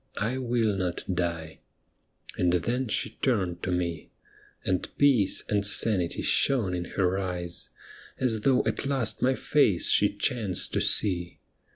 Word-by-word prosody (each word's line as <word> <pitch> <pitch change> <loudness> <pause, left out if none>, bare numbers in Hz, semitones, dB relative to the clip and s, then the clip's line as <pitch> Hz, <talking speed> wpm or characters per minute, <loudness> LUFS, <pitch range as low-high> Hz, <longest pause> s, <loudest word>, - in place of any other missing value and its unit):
I 115 +6 -2
will 120 -4 0
not 90 -2 -3
die.' 85 -3 -3 0.8
And 90 -1 +1
then 120 +9 -1
she 110 +1 -2
turned 95 -9 0
to 90 - -3
me. 85 -2 -3 0.6
And 90 -2 -1
peace 130 -9 +3
and 100 -1 0
sanity 100 -3 +1
shone 115 -10 +2
in 90 -1 -3
her 95 0 +1
eyes, 90 -2 -3 0.5
As 115 -4 0
though 130 +2 +2
at - - -2
last 120 -6 0
my 130 +1 +2
face 110 - +2
she - - +3
chanced 105 -7 0
to - - 0
see. 90 -4 +1
100 Hz, 145 wpm, -27 LUFS, 90-120 Hz, 0.8 s, peace